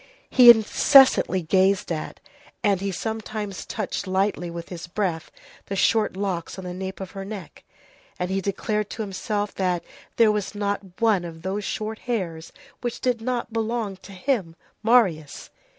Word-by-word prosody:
He 250 -2 +8
incessantly 230 - +6
gazed 190 +3 +2
at, 155 -2 -4 0.4
and 200 -4 +2
he 200 0 -1
sometimes 215 -1 -4
touched 205 -2 -3
lightly 190 -1 0
with 170 0 -7
his 175 -1 -7
breath, 175 -3 -2 0.4
the 195 - -3
short 210 0 +2
locks 190 -4 -3
on 190 - -7
the 180 - -5
nape 190 +1 -6
of 190 -1 -7
her 195 -1 -6
neck, 195 -4 -9 0.5
and 180 +1 -2
he 195 0 0
declared 210 +2 -2
to 220 - -4
himself 205 +1 -3
that 180 -2 -1 0.3
there 225 -2 +5
was 210 0 -3
not 200 -2 -3
one 220 -6 +3
of 165 -1 -9
those 195 +3 -2
short 220 0 -4
hairs 175 -9 -4 0.3
which 240 -1 -3
did 245 -3 0
not 240 -1 -3
belong 225 -2 -2
to 195 - -14
him, 190 -6 -1 0.3
Marius. 200 -11 +2
200 Hz, 160 wpm, -24 LUFS, 185-220 Hz, 0.5 s, He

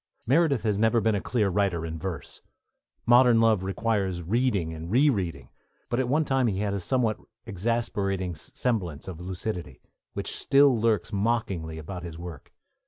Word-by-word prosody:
Meredith 140 -1 +3
has 105 -3 0
never 115 +1 +3
been 110 0 +2
a 100 - -1
clear 110 -5 0
writer 95 -4 0
in 80 0 -5
verse; 80 -3 -6 0.6
Modern 120 -1 +6
Love 110 -4 +4
requires 95 -2 -1
reading 100 -4 0
and 80 +1 -7
re 135 +8 +4
reading; 85 - -4 0.4
but 120 - 0
at 130 -2 0
one 155 +3 +2
time 135 -2 +2
he 100 -4 -1
had 100 0 -1
a 100 - -1
somewhat 115 +1 0 0.3
exasperating 100 -3 -1
semblance 85 - -3
of 90 -3 -7
lucidity, 90 - -5 0.3
which - - -4
still 140 -1 +4
lurks 110 -2 0
mockingly 100 -7 -1
about 90 +3 -7
his 85 -2 -8
work. 85 -5 -9
100 Hz, 165 wpm, -27 LUFS, 90-120 Hz, 0.6 s, Modern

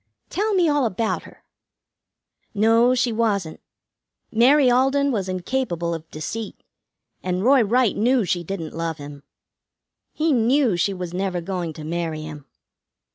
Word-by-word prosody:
"Tell 420 +2 0
me 355 -3 +3
all 290 -4 +2
about 220 +2 -2
her." - - -16 1.1
"No, 230 +4 +4
she 250 -1 +1
wasn't. 205 -7 -1 0.7
Mary 260 +5 +5
Alden 270 +3 +3
was 195 -6 -2
incapable 180 -3 -2
of 165 0 -7
deceit, 210 +9 -6 0.6
and 180 +1 -2
Roy 265 +2 +5
Wright 235 +1 +2
knew 240 +1 +2
she 175 -1 -1
didn't 170 -3 -5
love 165 -1 -3
him. 145 -1 -10 0.9
He 310 0 +1
knew 245 -2 +3
she 175 +3 +1
was 180 -2 -6
never 185 -1 -1
going 175 -1 -4
to 155 - -9
marry 160 -1 -3
him. 150 -2 -9
205 Hz, 140 wpm, -22 LUFS, 170-255 Hz, 1.1 s, Mary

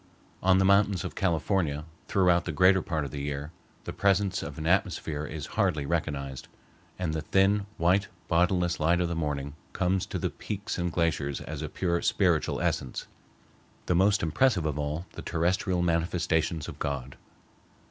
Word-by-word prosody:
On 95 0 +4
the 95 - +3
mountains 100 -2 +4
of - - -5
California, 80 -4 0 0.2
throughout 90 -3 +3
the 85 - -2
greater 90 +5 +5
part 80 -4 -2
of 70 - -7
the 70 - -5
year, 70 +1 -4 0.3
the - - -6
presence 100 -1 +2
of 70 - -7
an 80 - -5
atmosphere 80 -4 0
is 75 -2 -5
hardly 90 -9 +1
recognized, 70 -4 -3 0.5
and 90 -4 -2
the 80 - -2
thin, 100 +5 +2
white, 95 +4 +3 0.2
bodiless 90 0 +2
light 85 +3 +3
of 90 - +1
the 85 - -2
morning 70 -3 -2 0.2
comes 95 0 0
to - - -3
the - - -2
peaks 105 -1 -5
and 85 0 -1
glaciers 75 -5 0
as - - -6
a - - -4
pure 85 -2 -1
spiritual - - +1
essence, 65 - -2 0.8
the - - +1
most 100 +3 +3
impressive 90 +2 +2
of 75 -1 -1
all 75 +4 -3
the - - -8
terrestrial 90 +2 0
manifestations 85 -2 0
of - - -8
God. 70 -2 -3
85 Hz, 170 wpm, -28 LUFS, 75-95 Hz, 0.8 s, greater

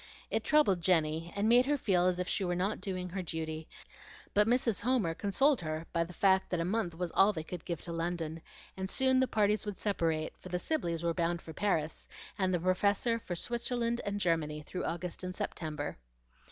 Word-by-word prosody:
It - - 0
troubled 290 - +4
Jenny, 165 -1 +2
and 205 +1 +1
made 245 +3 +6
her 290 0 +2
feel 185 -8 +2
as 180 -1 +1
if 180 0 -2
she 200 - 0
were 175 -1 0
not 190 +4 -1
doing 185 -2 -3
her 190 +2 -3
duty; 160 -2 -4 0.7
but 210 +1 +4
Mrs. 240 -3 +2
Homer 225 -7 +1
consoled 255 - +2
her 155 0 -3
by 170 -1 +2
the 170 - -9
fact 190 +2 +3
that 175 - 0
a 165 - 0
month 185 -3 -1
was 175 0 -3
all 195 +2 +5
they 160 -6 -4
could 175 +1 -7
give 170 -2 -4
to 170 - -6
London, 165 -1 -3 0.3
and 190 0 -4
soon 260 +2 +3
the 260 - +3
parties 210 -2 +2
would 205 -2 -5
separate, 165 -6 -1
for 185 - -10
the 180 - 0
Sibleys 175 - -1
were 170 0 +1
bound 170 0 0
for 160 - -10
Paris, 165 -6 -1 0.3
and 190 -2 +1
the 175 - +1
Professor 200 +6 +2
for 180 -5 -5
Switzerland 235 +3 -1
and 205 0 -2
Germany, 155 -4 0
through 180 - -4
August 175 +2 -4
and 185 0 -4
September. 150 - -4
180 Hz, 205 wpm, -32 LUFS, 165-210 Hz, 0.7 s, made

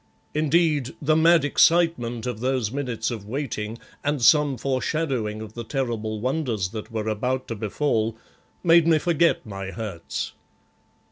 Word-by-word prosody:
Indeed, 155 -3 +1
the 155 +1 +2
mad 165 -1 +5
excitement 145 -7 +3
of 125 -3 -3
those 125 -3 0
minutes 130 -4 -2
of 105 -4 -6
waiting, 115 -4 -4 0.3
and 145 0 0
some 145 +2 +4
foreshadowing 130 -4 -1
of 110 -1 -10
the 120 - -6
terrible 110 -4 -2
wonders 125 -6 -1
that 110 +1 -7
were 110 -1 -3
about 125 +4 -1
to 115 - -3
befall, 110 +1 -1 0.5
made 165 -1 +5
me 165 -1 +5
forget 170 -2 +2
my 95 -3 -6
hurts. 95 -6 -5
125 Hz, 140 wpm, -24 LUFS, 110-150 Hz, 0.5 s, mad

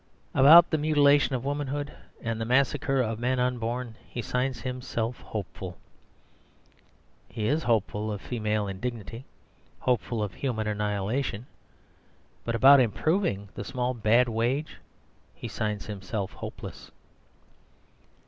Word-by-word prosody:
About 160 +6 +8
the 155 - +2
mutilation 145 -2 +4
of 125 +1 -4
womanhood, 145 0 -2 0.3
and 115 -1 -2
the - - +1
massacre 135 +2 +2
of 115 -2 -2
men 125 +1 0
unborn, 120 -1 -2
he - - -6
signs 125 +1 -1
himself 125 -2 -3
"Hopeful." 95 -3 -6 1.5
He 110 - -4
is 150 +8 +2
hopeful 110 -3 0
of 105 - -4
female 105 -3 -1
indignity, 115 +4 -5 0.6
hopeful 115 -2 0
of 100 -3 -4
human 115 -3 -2
annihilation. 105 +3 -2 1.0
But 115 - -2
about 135 +4 +8
improving 130 - +1
the - - -5
small 125 -1 -2
bad 115 +2 +3
wage 120 +6 -1 0.6
he - - -7
signs 105 -2 -3
himself 100 -1 -4
"Hopeless." - - -8
120 Hz, 120 wpm, -27 LUFS, 110-135 Hz, 1.5 s, About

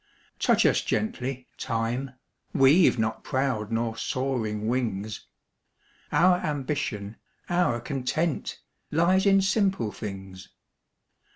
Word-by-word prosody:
Touch - - +3
us - - +4
gently, 130 - -2
Time! 120 +2 -2 0.4
We've 140 +4 +6
not 110 0 -1
proud 130 -5 -1
nor 115 0 -1
soaring 115 -5 -2
wings; 110 -4 -2 0.8
Our 180 +1 +5
ambition, 135 - -3 0.3
our 175 -9 +2
content, 140 +5 -2 0.3
Lies 185 +5 +3
in 195 -1 +5
simple 195 - +1
things. 95 -3 -8
130 Hz, 95 wpm, -26 LUFS, 110-160 Hz, 0.8 s, We've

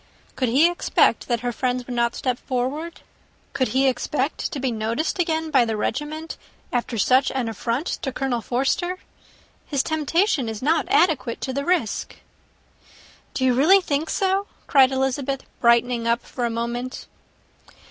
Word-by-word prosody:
Could 255 -3 0
he 280 +8 +5
expect 350 +1 +2
that 235 -2 0
her 245 0 -1
friends 250 +1 -2
would 250 - -6
not 235 0 +1
step 250 -2 -2
forward? 280 +6 -3 0.5
Could 260 - +1
he 265 +5 +2
expect 265 +2 -1
to 285 - -4
be 260 -1 -1
noticed 230 - -2
again 320 -2 0
by 265 -4 +5
the 225 -2 -2
regiment, 305 +8 -3 0.4
after 240 -1 -1
such 255 +6 +3
an 255 -3 -1
affront 230 +6 -2 0.2
to 265 - -2
Colonel 255 -2 -2
Forster? 275 - -1 0.7
His 280 -3 0
temptation 315 - +1
is 220 -1 -5
not 325 +5 +1
adequate 320 - +2
to 260 - -3
the 280 +1 -2
risk." 345 - -1 1.2
"Do 260 - 0
you 255 - +4
really 320 +10 +6
think 310 -3 -2
so?" 390 +1 0 0.2
cried 270 -2 +5
Elizabeth, 265 +1 -1 0.2
brightening 235 0 +3
up 235 +1 +1
for 245 - -3
a - - 0
moment. 235 +2 -4
265 Hz, 155 wpm, -23 LUFS, 240-310 Hz, 1.2 s, really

